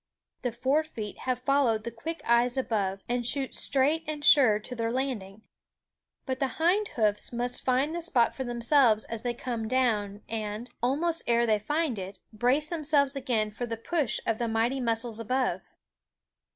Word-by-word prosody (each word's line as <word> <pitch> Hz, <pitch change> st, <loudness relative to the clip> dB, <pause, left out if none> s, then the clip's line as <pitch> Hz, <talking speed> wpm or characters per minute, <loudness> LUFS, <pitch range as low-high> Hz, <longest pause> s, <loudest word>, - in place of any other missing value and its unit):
The 245 Hz, -, -1 dB
fore 265 Hz, +6 st, +1 dB
feet 220 Hz, -9 st, -7 dB
have 250 Hz, 0 st, -1 dB
followed 255 Hz, -6 st, +2 dB
the 235 Hz, -, -5 dB
quick 320 Hz, +9 st, -6 dB
eyes 240 Hz, +2 st, +3 dB
above, 200 Hz, -7 st, -1 dB
and 245 Hz, 0 st, -1 dB
shoot 265 Hz, +3 st, -1 dB
straight 285 Hz, +4 st, +2 dB
and 300 Hz, -1 st, -4 dB
sure 255 Hz, -10 st, +6 dB
to 215 Hz, +4 st, -7 dB
their 230 Hz, -1 st, -1 dB
landing; 225 Hz, -6 st, -4 dB, 0.8 s
but 260 Hz, -1 st, -3 dB
the 270 Hz, -2 st, -2 dB
hind 370 Hz, +6 st, +2 dB
hoofs 210 Hz, -2 st, +1 dB
must 245 Hz, +1 st, -2 dB
find 265 Hz, +4 st, +1 dB
the 345 Hz, -, -3 dB
spot 255 Hz, -9 st, +2 dB
for 265 Hz, -, -4 dB
themselves 240 Hz, -2 st, +3 dB
as 230 Hz, -1 st, -5 dB
they 240 Hz, -1 st, -2 dB
come 235 Hz, -3 st, -4 dB
down 215 Hz, -5 st, 0 dB
and, 220 Hz, +1 st, -5 dB
almost 310 Hz, +7 st, +2 dB
ere 235 Hz, 0 st, +3 dB
they 215 Hz, -2 st, +2 dB
find 295 Hz, 0 st, -1 dB
it, 190 Hz, +1 st, -7 dB
brace 250 Hz, +7 st, +1 dB
themselves 295 Hz, -4 st, +1 dB
again 235 Hz, -6 st, 0 dB
for 240 Hz, +3 st, -5 dB
the 230 Hz, 0 st, -4 dB
push 275 Hz, 0 st, 0 dB
of 225 Hz, -1 st, 0 dB
the 235 Hz, -, 0 dB
mighty 230 Hz, +4 st, 0 dB
muscles 230 Hz, -2 st, 0 dB
above. 255 Hz, +3 st, -1 dB
245 Hz, 175 wpm, -28 LUFS, 225-275 Hz, 0.8 s, sure